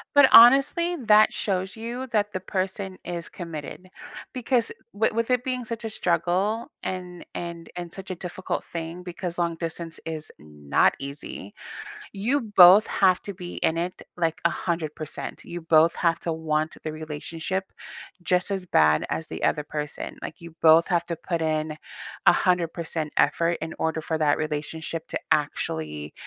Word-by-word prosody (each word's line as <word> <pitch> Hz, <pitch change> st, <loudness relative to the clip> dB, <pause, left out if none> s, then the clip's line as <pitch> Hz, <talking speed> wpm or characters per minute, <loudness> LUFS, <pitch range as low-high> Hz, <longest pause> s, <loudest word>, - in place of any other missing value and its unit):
But 285 Hz, -2 st, +8 dB
honestly, 275 Hz, +9 st, +7 dB
that 215 Hz, 0 st, +6 dB
shows 190 Hz, -1 st, -2 dB
you 240 Hz, +3 st, -5 dB
that 210 Hz, -3 st, 0 dB
the 185 Hz, -, -2 dB
person 190 Hz, 0 st, -3 dB
is 170 Hz, -1 st, -5 dB
committed, 170 Hz, +1 st, -7 dB, 0.5 s
because 250 Hz, -2 st, +1 dB, 0.2 s
w 215 Hz, +1 st, +1 dB
with 230 Hz, +2 st, 0 dB
it 250 Hz, -1 st, +3 dB
being 255 Hz, -1 st, -2 dB
such 230 Hz, 0 st, -6 dB
a -, -, -4 dB
struggle 185 Hz, +4 st, 0 dB
and 180 Hz, -1 st, -5 dB
and 170 Hz, -1 st, -6 dB
and 175 Hz, -1 st, -5 dB
such 190 Hz, 0 st, -9 dB
a -, -, -1 dB
difficult 180 Hz, +1 st, -4 dB
thing 170 Hz, +1 st, -5 dB
because 180 Hz, -1 st, -5 dB
long 170 Hz, -1 st, +1 dB
distance 165 Hz, 0 st, -6 dB
is 155 Hz, -1 st, -6 dB
not 75 Hz, -1 st, +1 dB
easy, 140 Hz, -7 st, -8 dB, 0.6 s
you 240 Hz, +9 st, 0 dB
both 185 Hz, +4 st, +9 dB
have 185 Hz, -2 st, +3 dB
to 200 Hz, -, -6 dB
be 175 Hz, -1 st, -8 dB
in 160 Hz, -, +2 dB
it, 175 Hz, +2 st, -3 dB
like, 165 Hz, -2 st, 0 dB
100%. 160 Hz, -3 st, -3 dB
You 175 Hz, 0 st, -6 dB
both 160 Hz, 0 st, +4 dB
have 165 Hz, -1 st, +1 dB
to 170 Hz, -, -2 dB
want 155 Hz, 0 st, -1 dB
the 155 Hz, -, -3 dB
relationship 160 Hz, +4 st, -4 dB, 0.6 s
just 180 Hz, +2 st, +1 dB
as 190 Hz, -2 st, -2 dB
bad 75 Hz, -, +4 dB
as 160 Hz, -, -2 dB
the -, -, -6 dB
other 150 Hz, -, +1 dB
person, 150 Hz, 0 st, -5 dB
like, -, -, -8 dB
you 170 Hz, -1 st, -10 dB
both 160 Hz, +1 st, +7 dB
have 170 Hz, -2 st, +1 dB
to 170 Hz, -, -2 dB
put 170 Hz, +1 st, -3 dB
in 155 Hz, -1 st, -1 dB, 0.5 s
100% 170 Hz, -3 st, +2 dB
effort 170 Hz, 0 st, +2 dB
in 160 Hz, -, -4 dB
order 160 Hz, 0 st, 0 dB
for 160 Hz, +1 st, -2 dB
that 150 Hz, -2 st, +3 dB
relationship 155 Hz, +1 st, -4 dB
to -, -, -2 dB
actually 75 Hz, -1 st, -1 dB
170 Hz, 160 wpm, -25 LUFS, 160-190 Hz, 0.6 s, both